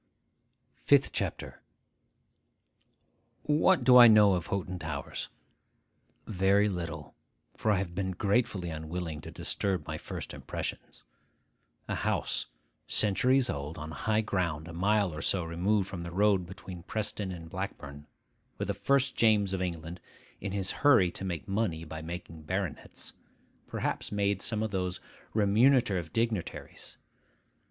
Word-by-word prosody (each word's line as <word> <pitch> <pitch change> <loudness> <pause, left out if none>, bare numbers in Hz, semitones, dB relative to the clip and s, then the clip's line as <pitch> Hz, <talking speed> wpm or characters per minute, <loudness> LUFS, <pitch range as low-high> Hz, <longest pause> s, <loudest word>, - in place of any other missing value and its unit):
FIFTH - - +4
CHAPTER - - -4 1.8
WHAT 150 +1 +3
do 125 0 +8
I 120 -1 +11
know 105 -3 +7
of 90 -2 -2
Hoghton 95 -2 -3
Towers? 80 -3 -5 1.0
Very 100 +1 +3
little; 85 -6 -5 0.4
for 110 - -1
I 105 - +4
have 90 -2 -3
been 95 +1 -2
gratefully 100 -2 0
unwilling 80 0 -5
to - - -9
disturb 95 -3 -1
my - - -5
first - - -6
impressions. - - -6 0.8
A - - -2
house, - - -1 0.4
centuries 125 +6 +3
old, 70 -1 -4
on 80 0 -6
high 110 +9 0
ground 85 -7 -2
a 85 - -8
mile 100 +1 +2
or 75 - -5
so 90 +1 +1
removed 90 +5 0
from 90 -3 -6
the 85 - -5
road 95 0 +2
between 90 -1 -9
Preston 105 +1 -3
and 85 -2 -8
Blackburn, 75 -6 -6 0.5
where - - -2
the - - -1
first 140 -1 +1
James 105 -4 +3
of 95 - -1
England, 85 -1 -4 0.4
in 100 - -4
his 95 -1 -1
hurry 125 -12 +6
to - - -8
make 90 -4 -4
money 95 -5 -1
by 80 0 -7
making 85 -1 -7
baronets, 90 -1 -4 0.5
perhaps - - -3
made 100 -1 0
some 110 -2 0
of 110 - -2
those 90 -2 -2 0.4
remunerative 105 - +3
dignitaries. 115 -5 -3
95 Hz, 135 wpm, -30 LUFS, 85-105 Hz, 1.8 s, I